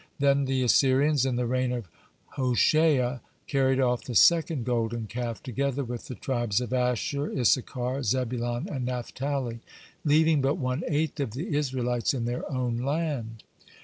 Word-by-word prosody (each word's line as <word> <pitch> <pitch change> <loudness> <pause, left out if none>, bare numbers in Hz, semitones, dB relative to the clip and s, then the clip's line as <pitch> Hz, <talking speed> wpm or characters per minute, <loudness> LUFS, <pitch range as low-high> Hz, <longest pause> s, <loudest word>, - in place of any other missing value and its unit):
Then 140 -1 +3
the 130 -1 0
Assyrians, 135 +2 +3
in 130 - 0
the 125 0 0
reign 125 +1 0
of 120 -5 -4 0.4
Hoshea, 130 0 +2 0.3
carried 135 -2 +1
off 125 -2 +1
the 125 - -6
second 160 -5 +4
golden 115 -2 -1
calf 115 0 -5
together 140 +2 -1
with 120 -1 -6
the 125 - -6
tribes 120 -6 -1
of 125 0 -4
Asher, 125 +3 0
Issachar, 125 +1 +1
Zebulon, 120 0 -1
and 135 -3 -4
Naphtali, 125 0 -3 0.4
leaving 155 0 +4
but 135 +3 +1
one 130 -1 -2
eighth 155 -1 -1
of 130 -7 -2
the 155 - -3
Israelites 125 -3 0
in 120 -3 -2
their 120 +4 -3
own 125 -3 -1
land. 135 -5 -2
130 Hz, 150 wpm, -27 LUFS, 120-140 Hz, 0.4 s, second